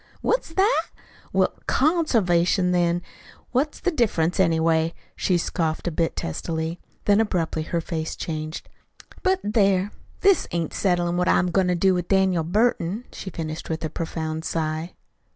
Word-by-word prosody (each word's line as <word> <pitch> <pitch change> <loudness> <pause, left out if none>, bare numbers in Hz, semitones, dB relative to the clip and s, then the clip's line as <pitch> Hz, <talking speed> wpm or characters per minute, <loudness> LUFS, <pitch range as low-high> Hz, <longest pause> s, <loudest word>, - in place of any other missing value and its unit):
"Heh? - - -30
What's - - 0
that? 400 +5 +3 0.5
Well, - - +2
CONservation, 200 - +2
then. 175 0 +1 0.5
What's 280 +4 0
the 365 - 0
difference, 190 - +1
anyway?" 165 -2 +2 0.2
she 180 - +1
scoffed 165 -1 -1
a - - 0
bit 165 +1 0
testily. 160 - -3 0.3
Then, 205 +1 +5
abruptly, 170 -7 -1
her 170 +2 -2
face 160 -1 -4
changed. 155 0 -5 0.5
"But, 375 -1 +2
there! 200 -2 +2 0.3
this 395 -1 +4
ain't 170 -2 -2
settlin' 175 -2 +1
what 180 0 +2
I'm 180 -1 +3
going 190 +1 +2
to 180 - +2
do 190 +2 +3
with 180 -1 -2
Daniel 190 -4 +3
Burton," 210 +3 +1
she 190 - -7
finished 160 -3 -5
with 160 0 -2
a 155 - -4
profound 160 -1 -3
sigh. 160 +1 -2
175 Hz, 150 wpm, -24 LUFS, 160-200 Hz, 0.5 s, Then